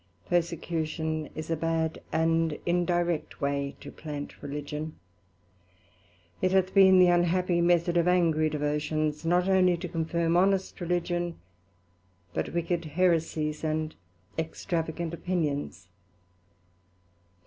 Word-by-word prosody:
Persecution 160 -2 -1
is 155 +1 -5
a - - +2
bad 160 0 -1
and 165 -1 +1
indirect 175 -1 0
way 140 -1 -1
to - - -9
plant 145 -2 -7
Religion: 150 +2 -5 1.5
It 185 - +2
hath 190 0 +2
been 190 -1 +7
the 180 -1 +7
unhappy 175 0 +2
method 175 0 +3
of 170 0 +3
angry 165 -3 +3
Devotions, 150 +1 -1
not 180 +2 +3
only 185 -2 +4
to 180 +2 -5
confirm 165 0 0
honest 190 +1 +2
Religion, 175 0 -1 1.0
but 80 - -2
wicked 170 0 -1
Heresies, 155 -2 0
and 155 0 -1 0.5
extravagant 165 0 -3
Opinions. 155 - -2
165 Hz, 105 wpm, -28 LUFS, 155-175 Hz, 1.5 s, been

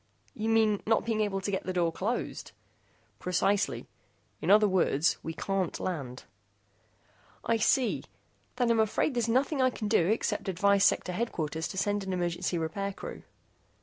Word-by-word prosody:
"You 220 +1 -3
mean 220 -2 +3
not 225 0 +2
being 225 -2 0
able 195 -2 -1
to 200 - -2
get 190 - -2
the 185 - -2
door 170 -2 +1
closed?" 215 +8 -3 0.7
"Precisely. 195 +3 0 0.6
In - - -2
other 210 +1 +6
words, 170 -5 +2
we 160 - -4
can't 190 +1 -2
land." 135 -8 -4 1.2
"I 230 - +2
see. 235 +3 +1 0.5
Then 245 -2 +2
I'm 230 - +2
afraid 220 +6 +1
there's 235 -2 0
nothing 270 +4 +1
I 255 - +4
can 220 -4 -5
do 205 -6 +3
except 220 -1 -1
advise 200 +2 +3
Sector 180 - +2
Headquarters 165 -7 -2
to 190 - -8
send 205 +1 0
an 190 -1 -3
emergency 175 0 -1
repair 195 +5 -3
crew." - - -8
200 Hz, 160 wpm, -29 LUFS, 180-225 Hz, 1.2 s, other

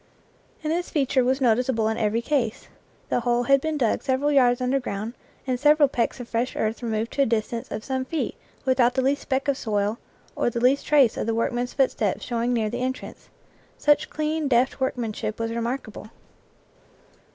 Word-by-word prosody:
And 310 +1 0
this 350 +1 -2
feature 270 -4 +1
was 260 +2 +1
noticeable 240 -1 +2
in 220 - 0
every 225 +1 0
case; 245 -6 -1 0.4
the - - +1
hole 240 0 +1
had 275 +2 +4
been 315 0 -2
dug 235 -6 +1
several 275 +2 +1
yards 245 -3 +4
under 255 +2 +1
ground 220 -2 -4 0.3
and 255 -2 -1
several 295 +1 +5
pecks 245 -1 -1
of 245 - -7
fresh 235 +2 -2
earth 220 +2 -1
removed 225 -1 -2
to 280 - 0
a - - +5
distance 230 +1 -2
of 215 - -5
some 260 0 -2
feet 320 +4 -2 0.3
without 255 -2 +3
the 260 - +1
least 275 +2 +1
speck 270 0 -1
of 280 -2 +1
soil 210 0 -1 0.4
or - - +1
the 235 - -3
least 255 +4 +2
trace 280 -6 +4
of - - -2
the 225 - 0
workman's 240 +2 -1
footsteps 230 -7 0
showing 235 0 -1
near 225 -3 +1
the 245 +1 -3
entrance; 260 0 -5 0.5
such 295 0 +3
clean, 310 0 -1
deft 255 +1 +2
workmanship 230 -4 -2
was 230 0 -2
remark 235 +3 -2
able. 215 0 -10
245 Hz, 190 wpm, -24 LUFS, 230-270 Hz, 0.5 s, several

